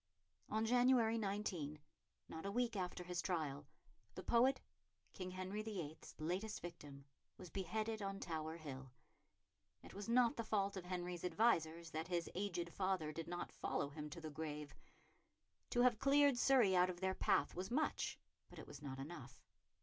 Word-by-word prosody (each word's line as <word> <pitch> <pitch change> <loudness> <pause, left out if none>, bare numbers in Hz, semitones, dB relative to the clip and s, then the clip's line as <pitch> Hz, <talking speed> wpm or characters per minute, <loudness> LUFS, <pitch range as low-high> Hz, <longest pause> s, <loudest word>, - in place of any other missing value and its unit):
On 220 +1 +1
January 245 -1 +5
19, 195 -8 -2 0.5
not 160 - -6
a 200 - -2
week 240 +1 +1
after 180 -2 -2
his 180 0 -2
trial, 150 -6 -2 0.5
the - - -5
poet, 255 +3 +4 0.5
King 185 -1 -4
Henry 185 +3 -3
VIII.'s 180 -8 -5
latest 185 +7 -2
victim, 145 -5 -8 0.3
was 180 -3 -10
beheaded 215 +4 -2
on 195 0 -3
Tower 160 -1 -3
Hill. 135 -5 -7 0.9
It - - -11
was 205 +3 -5
not 240 0 +5
the 230 - 0
fault 200 -2 +1
of 185 -2 -5
Henry's 180 -1 -3
advisers 170 -4 +2
that 160 +2 -3
his 175 -2 -1
aged 175 -3 -2
father 185 -5 0
did 165 +1 -5
not 175 0 -4
follow 140 - -1
him 150 +1 -6
to 150 - -7
the 160 -1 -6
grave. 150 -1 -4 1.0
To 245 - +3
have 245 -3 +5
cleared 280 +1 +6
Surrey 245 -6 +5
out 180 0 +5
of 175 -1 -4
their 190 0 +1
path 145 - +2
was 185 +2 -3
much; 300 +6 0 0.3
but - - -13
it - - -7
was 145 -1 -10
not 135 -2 -5
enough. 135 -3 -7
180 Hz, 165 wpm, -41 LUFS, 160-215 Hz, 1.0 s, cleared